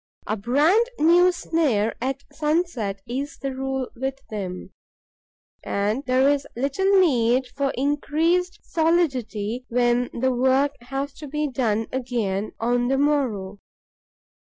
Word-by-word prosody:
A 215 Hz, -, -1 dB
brand 300 Hz, -, +3 dB
new 350 Hz, +3 st, +5 dB
snare 275 Hz, -, 0 dB
at 270 Hz, +2 st, -2 dB
sunset 300 Hz, -, -1 dB
is 275 Hz, +4 st, -4 dB
the 275 Hz, -1 st, -4 dB
rule 265 Hz, -1 st, -2 dB
with 265 Hz, +2 st, -3 dB
them. 190 Hz, -3 st, -5 dB, 0.9 s
And 210 Hz, +6 st, -1 dB
there 255 Hz, +2 st, +4 dB
is 285 Hz, -1 st, +1 dB
little 385 Hz, +11 st, +2 dB
need 255 Hz, -7 st, +3 dB
for 280 Hz, 0 st, 0 dB
increased 315 Hz, +6 st, 0 dB
solidity 260 Hz, -9 st, 0 dB
when 240 Hz, 0 st, +2 dB
the 260 Hz, +2 st, 0 dB
work 260 Hz, +3 st, +3 dB
has 270 Hz, +3 st, -4 dB
to 300 Hz, -, -7 dB
be 300 Hz, +2 st, -1 dB
done 225 Hz, -5 st, 0 dB
again 225 Hz, -6 st, -2 dB
on 245 Hz, +1 st, +1 dB
the 270 Hz, +1 st, +1 dB
morrow. 245 Hz, -10 st, 0 dB
265 Hz, 125 wpm, -24 LUFS, 235-295 Hz, 0.9 s, new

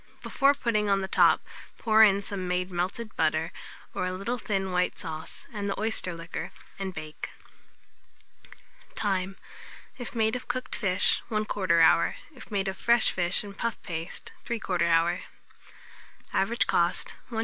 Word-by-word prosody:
Before 280 Hz, +1 st, +3 dB
putting 215 Hz, -6 st, +1 dB
on 195 Hz, -1 st, +3 dB
the 190 Hz, -, -2 dB
top, -, -, +4 dB, 0.3 s
pour 220 Hz, -1 st, +4 dB
in 200 Hz, -1 st, +5 dB
some 190 Hz, -2 st, -4 dB
made 180 Hz, +1 st, -1 dB
melted 190 Hz, +6 st, -3 dB
butter, 160 Hz, +1 st, +1 dB, 0.4 s
or -, -, -1 dB
a 185 Hz, -, -2 dB
little 205 Hz, +7 st, -2 dB
thin 195 Hz, -3 st, -1 dB
white 180 Hz, 0 st, +1 dB
sauce, 160 Hz, -2 st, -5 dB
and 205 Hz, -2 st, -2 dB
the 200 Hz, -, -2 dB
oyster 215 Hz, -5 st, 0 dB
liquor, 165 Hz, +1 st, -5 dB, 0.3 s
and 195 Hz, -1 st, -2 dB
bake. 155 Hz, -3 st, -7 dB, 1.7 s
Time. 195 Hz, -2 st, -1 dB, 0.6 s
If 245 Hz, -, -6 dB
made 220 Hz, 0 st, +2 dB
of 250 Hz, -, -5 dB
cooked 255 Hz, 0 st, -2 dB
fish, 195 Hz, -2 st, +2 dB
1/4 205 Hz, -5 st, +1 dB
hour; 170 Hz, +1 st, +5 dB, 0.2 s
if 255 Hz, -, -12 dB
made 200 Hz, -3 st, -1 dB
of 190 Hz, 0 st, -3 dB
fresh 235 Hz, -1 st, +4 dB
fish 175 Hz, +2 st, +1 dB
and 200 Hz, -1 st, -9 dB
puff 230 Hz, +3 st, -2 dB
paste, 165 Hz, -3 st, -6 dB
3/4 215 Hz, -6 st, -2 dB
hour. 170 Hz, 0 st, +3 dB, 1.1 s
Average 215 Hz, +5 st, +2 dB
cost, 170 Hz, 0 st, +1 dB, 0.2 s
1s. 225 Hz, -3 st, -3 dB
195 Hz, 150 wpm, -28 LUFS, 175-220 Hz, 1.7 s, in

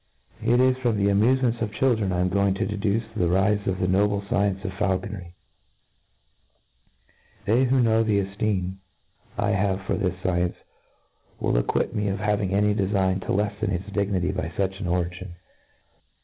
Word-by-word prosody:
It 120 Hz, +1 st, +3 dB
is 130 Hz, 0 st, +4 dB
from 120 Hz, -4 st, 0 dB
the 100 Hz, 0 st, +2 dB
amufements 120 Hz, +3 st, +2 dB
of 110 Hz, -2 st, -1 dB
children 110 Hz, -6 st, +1 dB
I 90 Hz, 0 st, 0 dB
am 90 Hz, -, +1 dB
go 100 Hz, +2 st, +2 dB
ing 95 Hz, -, +1 dB
to 100 Hz, -, -1 dB
deduce 105 Hz, +1 st, -1 dB
the 90 Hz, -5 st, +1 dB
rife 100 Hz, +3 st, +1 dB
of 95 Hz, -1 st, 0 dB
the 90 Hz, -, +1 dB
noble 100 Hz, +2 st, +2 dB
fcience 100 Hz, -1 st, 0 dB
of 95 Hz, -, -2 dB
faulconry; 95 Hz, -2 st, -3 dB, 2.1 s
They 120 Hz, +5 st, +3 dB
who 130 Hz, 0 st, +3 dB
know 110 Hz, -1 st, +3 dB
the 110 Hz, -2 st, +2 dB
efteem 95 Hz, -2 st, -2 dB, 0.6 s
I -, -, +1 dB
have 100 Hz, -1 st, 0 dB
for -, -, -2 dB
this 95 Hz, -4 st, -1 dB
fcience 90 Hz, -1 st, 0 dB, 0.8 s
will -, -, 0 dB
acquit -, -, 0 dB
me 105 Hz, -1 st, -1 dB
of 100 Hz, 0 st, -1 dB
having 105 Hz, -1 st, 0 dB
any 105 Hz, +1 st, +2 dB
de^ 100 Hz, -2 st, 0 dB
fign 95 Hz, -2 st, +1 dB
to -, -, -11 dB
leffen 105 Hz, +2 st, -1 dB
its 95 Hz, +1 st, -3 dB
dignity 100 Hz, -3 st, 0 dB
by 80 Hz, -, -3 dB
fuch 95 Hz, +2 st, -2 dB
an 95 Hz, -, -3 dB
origin. 90 Hz, +1 st, -2 dB
100 Hz, 175 wpm, -25 LUFS, 95-105 Hz, 2.1 s, is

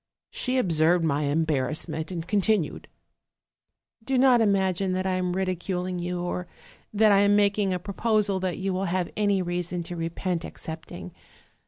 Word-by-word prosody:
She 255 Hz, 0 st, 0 dB
observed 170 Hz, -5 st, +2 dB
my 150 Hz, -1 st, 0 dB
embarrassment, 155 Hz, +1 st, 0 dB
and 170 Hz, -2 st, -5 dB
continued: 205 Hz, -4 st, 0 dB, 0.6 s
" 225 Hz, -, -41 dB
'Do 265 Hz, +2 st, 0 dB
not 250 Hz, -2 st, +5 dB
imagine 190 Hz, -3 st, +1 dB
that 185 Hz, 0 st, -1 dB
I 190 Hz, -, +1 dB
am 180 Hz, -1 st, -1 dB
ridiculing 185 Hz, -1 st, -2 dB
you, 175 Hz, 0 st, -3 dB
or 180 Hz, 0 st, -3 dB, 0.4 s
that 215 Hz, 0 st, +4 dB
I 200 Hz, -, +5 dB
am 205 Hz, 0 st, +4 dB
making 205 Hz, -1 st, +2 dB
a 180 Hz, -, 0 dB
proposal 205 Hz, +1 st, 0 dB
that 185 Hz, -2 st, -2 dB
you 195 Hz, 0 st, -2 dB
will 190 Hz, +1 st, -1 dB
have 180 Hz, -1 st, -1 dB
any 205 Hz, -3 st, +1 dB
reason 175 Hz, 0 st, -3 dB
to 175 Hz, -, -7 dB
repent 170 Hz, +1 st, -3 dB
accepting. 155 Hz, -, -8 dB
185 Hz, 160 wpm, -26 LUFS, 170-200 Hz, 0.6 s, not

